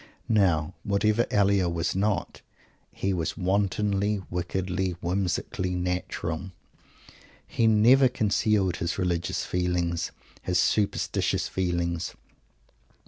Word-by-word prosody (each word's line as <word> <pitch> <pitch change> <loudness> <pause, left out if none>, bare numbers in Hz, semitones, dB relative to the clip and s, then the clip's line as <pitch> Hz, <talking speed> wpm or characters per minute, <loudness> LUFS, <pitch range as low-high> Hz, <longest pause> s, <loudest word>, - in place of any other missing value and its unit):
Now, 90 -7 +2
whatever 105 +3 +1
Elia 100 -3 +3
was 85 0 -1
not, 100 -1 -1 0.5
he 95 0 -2
was 85 -2 -2
wantonly, 100 +1 0
wickedly, 90 +1 -2
whimsically 90 0 -1
natural. 90 -1 -3 1.0
He 115 - +1
never 120 +5 +6
concealed 105 -5 +1
his 85 - -2
religious 90 -3 -1
feelings, 90 -2 -1 0.3
his 90 -1 0
superstitious 100 +2 +1
feelings. 85 -2 -2
95 Hz, 90 wpm, -27 LUFS, 90-100 Hz, 1.0 s, never